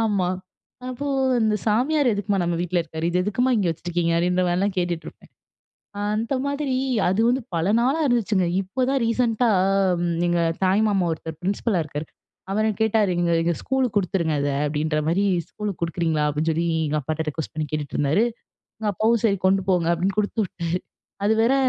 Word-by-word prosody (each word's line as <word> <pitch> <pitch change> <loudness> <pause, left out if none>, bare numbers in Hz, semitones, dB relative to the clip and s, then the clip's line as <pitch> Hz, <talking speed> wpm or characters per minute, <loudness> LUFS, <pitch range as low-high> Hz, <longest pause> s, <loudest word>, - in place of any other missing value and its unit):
ஆமா. 200 -5 +1 0.6
அப்போ 255 +3 -5 0.3
"அந்த 215 -1 +2
சாமியார் 260 +6 +2
எதுக்குமா 205 0 -1
நம்ம 170 0 0
வீட்ல 180 0 0
இருக்காரு? 160 0 -4
இது 180 +1 +1
எதுக்குமா 245 +6 +1
இங்கே 195 -4 +1
வச்சுருக்கீங்க?'' 170 0 -1
அப்டின்ற 180 +1 +1
மாரிலாம் 190 +3 +1
கேட்டுட்டு 175 -2 -1
இருப்பேன். - - -16 0.8
அந்த 225 +5 -1
மாதிரி 280 -2 -1 0.3
அது 190 +4 +1
வந்து 255 +2 +2
பல 170 +5 +1
நாளா 270 +6 +2
இருந்துச்சுங்க 215 -6 +2 0.2
இப்போதான் 255 +8 -1
ரீசென்ட்டா 230 0 +1 0.8
எங்க 175 0 +1 0.3
தாய் 190 +3 +3
மாமா 195 -4 +1
ஒருத்தர் 160 -1 -7
பிரின்சிபலா 195 0 0
இருக்காரு. 150 +1 -6 0.5
அவர் 215 +2 +1
கேட்டாரு. 220 -3 +2
"நீங்க 170 -1 +1
இத, 170 0 +1
ஸ்கூலுக்கு 260 -5 0
குடுத்துருங்க 170 -5 0
இத 145 - 0 0.2
அப்டின்ற 150 +1 0
மாரி 195 +5 +2 0.3
ஸ்கூலுக்கு 205 -5 -5
குடுக்குறீங்களா?" 165 -2 0
அப்டின்னு 155 +3 -1
சொல்லி, 165 +2 0 0.2
எங்க 150 +1 0
அப்பாட்ட 155 +3 -3
ரிக்வெஸ்ட் 155 0 -6
பண்ணி 155 -1 -2
கேட்டுட்டு 150 -2 -3
இருந்தாரு. 150 +10 +2 0.6
எங்க 210 -1 0
அப்பாவும் 225 +3 +2
"சரி, 200 -4 +3
கொண்டு 190 0 +2
போங்க" 170 -2 +2
அப்டின்னு 190 +4 -1
குடுத்துவிட்டாரு 180 -5 -2 0.5
அது 210 - +4
வேற 245 +4 +3
190 Hz, 165 wpm, -23 LUFS, 170-220 Hz, 0.8 s, அது